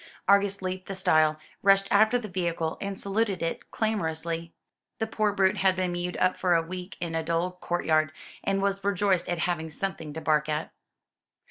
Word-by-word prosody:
Argus 200 0 +3
leaped 185 0 -4
the 195 - -4
stile, 155 -4 +3 0.2
rushed 195 0 +5
after 215 +4 +5
the 235 -3 -5
vehicle, 170 -4 -2
and 200 -1 -4
saluted 200 -2 0
it 165 - -3
clamorously. 165 -6 -2 0.5
The 225 - 0
poor 215 -1 0
brute 195 0 +2
had 190 -1 +3
been 185 -1 0
mewed 175 0 -3
up 185 - +2
for 180 -2 +3
a 165 - +3
week 180 +2 -7
in 170 -1 -3
a 165 - 0
dull 165 +2 0
courtyard, 155 -3 +1 0.3
and 195 0 0
was 200 -1 0
rejoiced 200 -2 +1
at 175 - 0
having 170 -1 -1
something 160 -1 -4
to 160 - -4
bark 155 -1 +1
at. 150 0 -2
185 Hz, 185 wpm, -27 LUFS, 165-195 Hz, 0.5 s, rushed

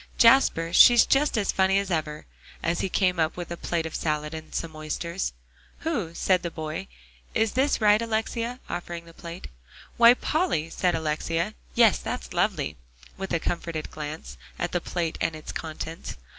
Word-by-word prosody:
Jasper, 230 -9 +5
she's 240 +4 +8
just 280 -2 +2
as 205 -2 +1
funny 190 0 +3
as 200 -1 -1
ever," 155 -2 -2 0.4
as 170 +1 0
he 195 - -1
came 180 -1 +1
up 160 +1 +1
with 175 -1 -6
a - - -2
plate 170 -1 -2
of 160 - -5
salad, 150 0 -2
and 160 0 -8
some 165 -2 -3
oysters. 170 +4 -3 0.5
"Who?" 220 - -2
said 185 0 +2
the 170 - -3
boy; 155 -1 -5 0.5
"is 220 -1 +2
this 275 +3 +1
right, 210 0 +5
Alexia?" 230 +2 -2
offering 170 -1 -5
the 165 - -14
plate. 170 +2 -8 0.5
"Why, 235 +1 +8
Polly," 250 - 0
said 180 0 +1
Alexia; 160 +1 -1 0.2
"yes, - - +5
that's - - -5
lovely," 75 -1 0 0.4
with 195 0 -6
a 165 - +1
comforted 170 -2 -3
glance 155 +1 -7 0.2
at 175 - -2
the 175 - 0
plate 170 -2 -3
and 165 -1 0
its 155 - -7
contents. 160 +1 -6
170 Hz, 170 wpm, -26 LUFS, 160-200 Hz, 0.5 s, she's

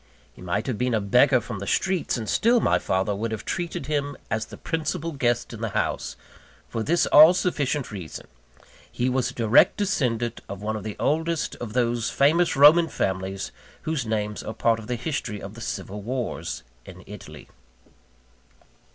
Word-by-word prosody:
He - - -16
might 90 +4 -2
have 125 -6 -3
been 125 -1 +1
a - - +2
beggar 125 +6 +4
from 105 -3 -6
the 100 - -6
streets; 190 -7 0
and 110 -2 -5
still 235 - +3
my - - +2
father 95 +2 0
would 110 +3 -3
have 110 - -5
treated 170 -5 -3
him 145 -1 -2
as 110 0 -1
the - - -11
principal 165 +1 -3
guest 120 -5 -1
in 115 - -8
the 115 - -1
house, - - -2 0.5
for 115 - -4
this 170 +8 +2
all 155 +4 +8
sufficient 150 -7 -1
reason 90 -6 -7 0.7
he 125 +1 0
was 130 0 0
a - - -11
direct 115 0 +4
descendant 125 - -1
of 100 - -6
one 110 +2 -3
of 105 - -5
the 105 -1 -5
oldest 160 +2 0
of 115 -3 -7
those 120 -2 +1
famous 160 +5 +3
Roman 155 +4 +7
families 95 -6 -3 0.3
whose 155 -4 -1
names 105 -2 -2
are 110 - -6
part 115 0 +2
of 110 - -10
the 125 - -1
history 120 -4 -3
of 100 +1 -8
the 115 - -11
Civil 100 -1 -5
Wars 125 - -4 0.2
in - - -12
Italy. - - -11
120 Hz, 180 wpm, -25 LUFS, 105-150 Hz, 0.7 s, all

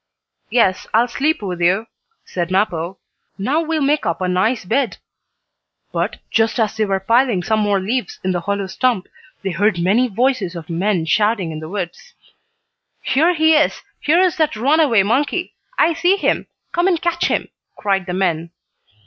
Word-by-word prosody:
"Yes, 215 -5 +2
I'll 235 +2 +4
sleep 280 +1 -1
with 180 -3 -4
you," 190 +6 +2 0.4
said 175 -1 -3
Mappo. 185 -2 0 0.4
"Now 265 +11 0
we'll 320 -2 -1
make 295 +2 +2
up 170 - -1
a 185 - -1
nice 190 +5 +1
bed." 245 +6 0 0.9
But, - - -2
just 225 +1 +1
as 220 -1 +1
they 220 -1 +1
were 195 -1 0
piling 230 -1 +2
some 220 +2 +1
more 205 -2 +2
leaves 215 +3 -3
in 185 - 0
the 180 - 0
hollow 200 +3 -2
stump, 195 +1 0 0.4
they 195 - -1
heard 200 +3 +1
many 205 +9 +3
voices 230 -5 0
of 170 0 -7
men 180 0 0
shouting 210 +1 +1
in 155 - -6
the 155 0 -8
woods. 185 -3 -6 0.9
"Here 325 +7 +2
he 320 0 +4
is! 305 0 +2 0.2
Here 320 +4 +3
is 370 -1 +2
that 310 -7 +1
runaway 265 -2 +3
monkey! 285 - 0 0.2
I 335 - +4
see 350 +4 +2
him! - - 0 0.2
Come 345 +1 +1
and 355 -4 +2
catch 345 0 0
him!" - - -1 0.3
cried 195 -2 -1
the 180 - -3
men. 170 -3 0
215 Hz, 175 wpm, -19 LUFS, 185-275 Hz, 0.9 s, I'll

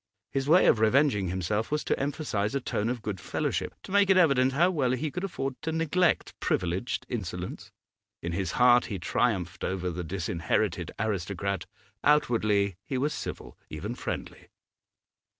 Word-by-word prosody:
His 135 +1 -1
way 175 +3 +6
of 110 - +5
revenging 110 -3 +3
himself 95 +5 -1
was 150 0 0
to - - 0
emphasise 135 -6 -1
a - - +2
tone 115 -3 -1
of 120 -3 -3
good 100 -4 -3
fellowship, - - -2
to - - -10
make 200 0 +4
it 190 - +6
evident 135 -7 +4
how 175 +6 +4
well 135 -7 +1
he 145 +4 -2
could 180 - -4
afford 135 -8 -4
to 160 - -2
neglect 165 +2 +1
privileged 90 +7 -1
insolence. 90 -5 -5 0.5
In 85 - -4
his 95 +1 -2
heart 125 0 +5
he 100 - -3
triumphed 90 -2 -1
over 90 -1 -1
the 90 +1 -4
disinherited 85 +1 -1
aristocrat; 100 -3 -2 0.4
outwardly 110 - +2
he 130 - -3
was 145 +4 0
civil, - - -6
even 90 +9 -5
friendly. - - -6
110 Hz, 160 wpm, -28 LUFS, 95-140 Hz, 0.5 s, way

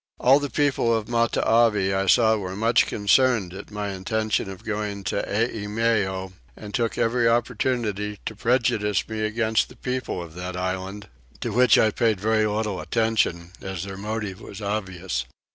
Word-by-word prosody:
All 135 +3 +6
the 145 -1 -3
people 125 -4 +2
of 105 -1 -5
Matavai 115 -3 +2
I 95 0 0
saw 110 +2 +5
were 95 -3 -4
much 115 +3 +3
concerned 105 -2 +2
at 100 +2 -9
my 105 -1 -4
intention 105 +2 -1
of 95 -1 -9
going 105 -2 -3
to 100 - -1
Eimeo, 105 -3 -1 0.2
and 105 -1 -9
took 115 -2 0
every 115 +1 +2
opportunity 115 -3 -1
to 110 - -4
prejudice 110 -3 +1
me 110 -1 -5
against 110 +1 +1
the - - -14
people 125 -6 -3
of 80 -2 -11
that 90 +1 -6
island; 95 +2 -4 0.3
to 120 - -2
which 125 0 +5
I 110 - +4
paid 110 -3 +1
very 110 +1 +2
little 105 -3 -2
attention 110 -7 0
as 95 -3 -5
their 95 0 -6
motive 105 0 -4
was 100 - -9
obvious. 95 -4 -3
105 Hz, 160 wpm, -24 LUFS, 95-115 Hz, 0.3 s, All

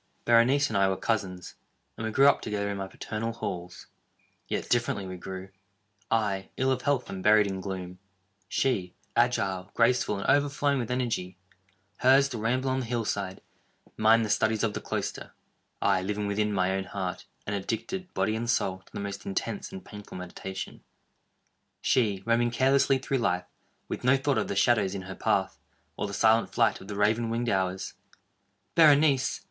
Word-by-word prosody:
Berenice 125 +5 +4
and 110 - -5
I 100 -1 +4
were 95 - -1
cousins, 95 -5 -2 0.4
and - - -6
we 110 - -2
grew 135 +5 +5
up 140 - +4
together 100 -1 -2
in 100 - -4
my 95 0 -4
paternal 115 +3 -4
halls. 90 -5 -6 0.6
Yet - - -2
differently 120 -5 0
we 95 0 -6
grew—I, 95 +2 -5
ill 130 +1 +2
of 130 -1 0
health, 140 -3 0
and 95 - -6
buried 105 +1 +5
in 95 -1 -3
gloom—she, 95 +2 -4 0.2
agile, 95 -7 +1
graceful, 115 -3 +2
and 100 - -4
overflowing 145 0 +2
with 120 - -3
energy; 115 -8 -2 0.6
hers, 135 +2 +5
the 120 -5 -5
ramble 130 +4 0
on 130 - 0
the 125 - -4
hill 120 -1 -1
side—mine 110 +3 -1
the 105 - -1
studies 110 0 +1
of 110 -2 +1
the - - -4
cloister; - - -4 0.5
I, 95 - +3
living 105 +2 -2
within 105 +1 0
my 95 -2 +1
own 95 0 -1
heart, 95 -2 -4 0.2
and 100 - -2
addicted, 115 - -4
body 110 - +1
and 115 +1 -3
soul, 95 -5 +1
to - - -23
the - - -6
most 100 0 -5
intense 100 - -3
and 190 0 -9
painful 105 -2 -10
meditation—she, 95 +3 -5
roaming 120 +1 +2
carelessly 135 +3 +3
through 135 0 -1
life, 90 -6 0 0.4
with - - -5
no 130 +2 +5
thought 135 +1 +1
of - - -1
the - - -3
shadows 100 -2 +3
in 95 - -5
her 95 +1 -7
path, - - 0 0.4
or - - -2
the 100 - -7
silent 110 +1 +3
flight - - +2
of 95 - -11
the 105 - -5
raven 110 +3 +2
winged 115 +1 -1
hours. 95 -1 -1 0.8
Berenice! 145 -4 +5
105 Hz, 170 wpm, -28 LUFS, 95-125 Hz, 0.8 s, grew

